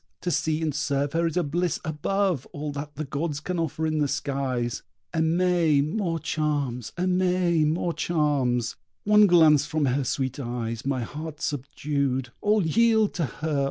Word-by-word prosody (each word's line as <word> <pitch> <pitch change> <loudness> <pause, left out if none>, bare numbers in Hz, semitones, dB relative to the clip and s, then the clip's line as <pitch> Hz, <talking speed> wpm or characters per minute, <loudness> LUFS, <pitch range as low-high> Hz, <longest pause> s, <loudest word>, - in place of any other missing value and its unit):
To 175 - -1
see 155 +1 0
and 155 -2 0
serve 140 -1 -1
her 165 +1 +2
is 165 - -3
a 180 - +3
bliss 170 +4 -1
above 170 0 -1
All 150 0 -4
that 145 +1 -6
the 155 - -3
gods 145 +2 -3
can 180 +3 -3
offer 160 -1 -2
in 155 -1 0
the 145 - +2
skies. 130 -4 -2 0.3
Aimée 165 -3 +2
more 170 -1 -1
charms, 145 -6 -2
&c. 180 - 0 2.0
One 210 0 +6
glance 155 -5 +6
from 155 -2 0
her 135 +2 +1
sweet 130 +1 -2
eyes 120 -2 -4
my 130 -3 0
heart 150 +4 -7
subdued. 140 -2 -2
All 210 -3 +2
yield 220 +4 +3
to 170 - -1
her! 155 +2 -2
150 Hz, 155 wpm, -26 LUFS, 140-165 Hz, 2.0 s, One